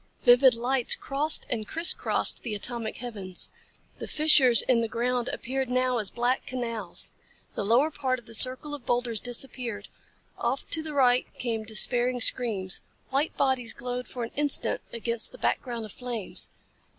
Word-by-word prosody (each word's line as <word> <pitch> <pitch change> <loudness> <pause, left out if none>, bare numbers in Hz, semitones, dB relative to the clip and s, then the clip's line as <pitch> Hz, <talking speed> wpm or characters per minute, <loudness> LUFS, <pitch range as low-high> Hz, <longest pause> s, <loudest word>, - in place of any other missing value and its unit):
Vivid 250 +1 +6
lights 245 +1 +2
crossed 295 +3 +3
and 220 -3 -4
criss 335 +2 +4
crossed - - +1
the 225 -4 -4
atomic 230 +1 -3
heavens. 205 -7 -2 0.5
The - - -6
fissures 275 -7 +6
in 240 -2 +2
the 230 - -1
ground 245 +2 -1
appeared 265 +1 -3
now 255 -1 +1
as 205 -3 -1
black 245 +2 -1
canals. 230 -7 -3 0.4
The - - -3
lower 245 +9 +3
part 260 -3 -1
of 240 - -14
the 230 - -13
circle 255 +6 0
of 290 -4 -7
boulders 240 -2 0
disappeared. 240 -3 -1 0.5
Off 245 +3 -2
to 320 - +1
the 310 -2 -6
right 250 -2 +3
came 225 -3 -3
despairing 245 +3 +1
screams. 215 -7 0 0.3
White 280 +4 -1
bodies 255 -4 +1
glowed 250 0 -5
for 245 - -6
an 230 - -6
instant 295 - +2
against 235 0 -2
the - - -11
background 235 -3 -2
of 215 - -10
flames. 240 -4 -3
245 Hz, 165 wpm, -27 LUFS, 230-260 Hz, 0.5 s, Vivid